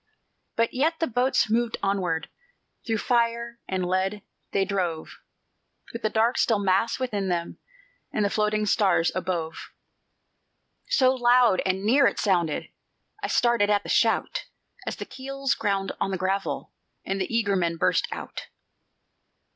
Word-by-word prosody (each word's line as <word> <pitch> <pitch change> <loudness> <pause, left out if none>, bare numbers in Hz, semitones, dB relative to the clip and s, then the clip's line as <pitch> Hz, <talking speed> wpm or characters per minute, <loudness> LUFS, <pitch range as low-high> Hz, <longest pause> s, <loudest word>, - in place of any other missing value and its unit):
But 230 0 +1
yet 315 +6 +1
the 325 - +2
boats 250 -1 +2
moved 230 +1 0
onward; 180 -5 0 0.6
Through 225 -1 +1
fire 235 0 0
and 185 -1 -1
lead 190 +3 -1 0.3
they 195 - +1
drove, 180 -5 -3 0.7
With 230 - -5
the 215 - +1
dark, 225 +3 +2
still 225 - +3
mass 200 +3 +1
within 210 -7 -2
them, 170 -1 -2 0.5
And 210 - 0
the 200 - 0
floating 215 0 +1
stars 190 -4 +3
above. 175 -3 -3 1.2
So 260 - +4
loud 245 -5 +4
and 190 +1 -1
near 265 +6 +5
it - - -1
sounded, 175 -7 0 0.5
I - - -2
started 235 -4 +2
at 205 -1 +2
the - - -8
shout, - - +1 0.4
As - - -2
the - - -6
keels 275 +1 -2
ground 195 -4 -1
on - - +1
the 190 - -2
gravel, 190 +2 -2 0.3
And 195 0 -2
the 185 - -3
eager 220 -4 +1
men 170 -2 0
burst - - +2
out. - - -7
205 Hz, 145 wpm, -26 LUFS, 190-235 Hz, 1.2 s, near